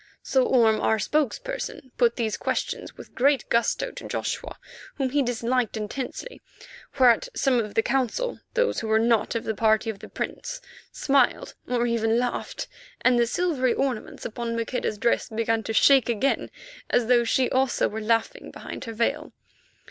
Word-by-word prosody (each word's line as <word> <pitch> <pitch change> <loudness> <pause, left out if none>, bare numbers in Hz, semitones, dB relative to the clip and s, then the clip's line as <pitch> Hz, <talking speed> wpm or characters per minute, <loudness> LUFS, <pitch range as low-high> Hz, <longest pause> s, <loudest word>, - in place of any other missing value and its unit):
So 260 -1 +2
Orme, 225 -4 +4
as - - -4
our 220 - +2
spokesman, 275 - -2
put 235 -2 +3
these 220 -3 -1
questions - - -3
with - - -12
great 275 +2 +2
gusto 235 0 +1
to - - -9
Joshua, - - -4 0.4
whom 265 -3 -1
he 290 +1 +2
disliked 245 -1 0
intensely, 255 - -5 0.6
whereat 245 -4 +4
some 260 -3 +2
of 210 -3 -4
the 225 - +3
Council, 270 - -1 0.2
those - - +2
who 225 - -4
were 220 0 +3
not 230 -1 +2
of 230 - -1
the 220 - -2
party 220 +1 +2
of 200 - -13
the - - -11
Prince, - - -5 0.3
smiled 275 -3 +1
or 240 -1 +1
even 230 -1 +1
laughed, 245 0 -2 0.3
and 250 -1 +4
the 235 - +3
silvery 260 -4 +1
ornaments 260 -5 -3
upon 230 +1 -3
Maqueda's 230 -1 -2
dress 235 +3 +1
began 225 0 0
to 225 - -5
shake 265 +2 +5
again 235 +4 0 0.4
as 245 - +2
though 240 0 +4
she 250 +2 +2
also 260 -1 +2
were 220 +1 -5
laughing 230 - 0
behind - - -8
her 230 - -6
veil. 230 +1 -1
240 Hz, 170 wpm, -25 LUFS, 225-260 Hz, 0.6 s, shake